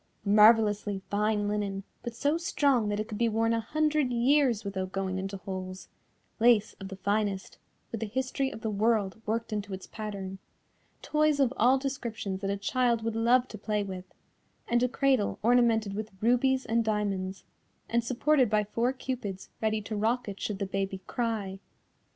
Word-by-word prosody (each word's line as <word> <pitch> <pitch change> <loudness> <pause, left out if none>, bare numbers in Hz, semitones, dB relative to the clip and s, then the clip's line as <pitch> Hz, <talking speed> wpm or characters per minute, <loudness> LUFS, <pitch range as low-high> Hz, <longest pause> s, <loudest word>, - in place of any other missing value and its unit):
Marvellously 210 -1 +4
fine 210 0 +1
linen, 205 -1 -2 0.2
but 235 -1 -6
so 285 +6 +1
strong 280 -9 +1
that 205 0 -1
it 215 - -2
could 210 - -6
be 235 -1 +3
worn 225 +1 +1
a 230 - +1
hundred 300 +3 +1
years 245 -1 +3
without 190 -1 -3
going 190 -1 -2
into 195 +1 -4
holes, 185 -1 -7 0.5
lace 225 -2 +4
of 195 - -6
the 195 - -7
finest, 200 0 -2 0.3
with 225 - -4
the 225 - -1
history 260 +4 -1
of 225 - -9
the 220 - -2
world 210 -1 +1
worked 225 0 -1
into 205 -2 -3
its 190 - -10
pattern, 195 -3 -6 0.6
toys 305 -1 +2
of 270 -2 +3
all 250 +4 +4
descriptions 235 -8 -4
that 195 - -2
a 200 - -1
child 235 +2 +1
would 225 0 -2
love 245 +3 +3
to 215 - -8
play 210 0 -1
with, 190 -2 -6 0.6
and 240 0 +2
a 250 - +2
cradle 265 -4 +1
ornamented 230 -3 +3
with 215 +1 -4
rubies 255 +4 +2
and 230 +1 +1
diamonds, 200 -3 -2 0.4
and 235 0 +1
supported 255 +1 +2
by 210 0 +2
four 230 +4 0
Cupids 235 -8 -5
ready 220 -1 0
to 215 - -4
rock 230 +4 0
it 200 -1 -6
should 210 - -2
the 200 - -2
baby 195 0 -3
cry. 215 -5 -2
220 Hz, 175 wpm, -29 LUFS, 200-240 Hz, 0.6 s, Marvellously